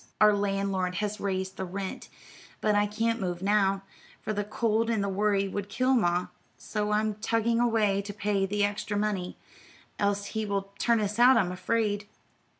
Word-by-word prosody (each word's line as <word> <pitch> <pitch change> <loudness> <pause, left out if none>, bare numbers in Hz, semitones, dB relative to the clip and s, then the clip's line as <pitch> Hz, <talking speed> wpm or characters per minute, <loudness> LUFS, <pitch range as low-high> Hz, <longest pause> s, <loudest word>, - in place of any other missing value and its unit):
"Our 210 -1 +6
landlord 195 -2 -1
has 210 +1 -2
raised 190 -1 -2
the - - -3
rent, 190 +1 -5 0.5
but 215 - +2
I 205 0 +3
can't 225 +2 -1
move 180 -1 -3
now, 195 -1 +2 0.4
for 215 - -3
the 205 0 -1
cold 225 +2 0
and 220 -3 +1
the - - -1
worry 200 0 +1
would 200 +1 -4
kill 255 +5 +1
ma; 180 -7 +2 0.3
so 210 -1 -3
I'm 215 0 +1
tugging 230 +2 0
away 220 -4 +2
to 205 +1 -6
pay 200 -1 0
the 205 +1 0
extra 205 0 -1
money, 205 -4 -2 0.6
else 200 0 +1
he 220 -1 -1
will 200 -1 -2
turn 235 -1 +3
us 210 +2 -2
out, 250 +1 +7
I'm 185 -5 +2
afraid." 205 +1 -1
205 Hz, 175 wpm, -28 LUFS, 195-215 Hz, 0.6 s, out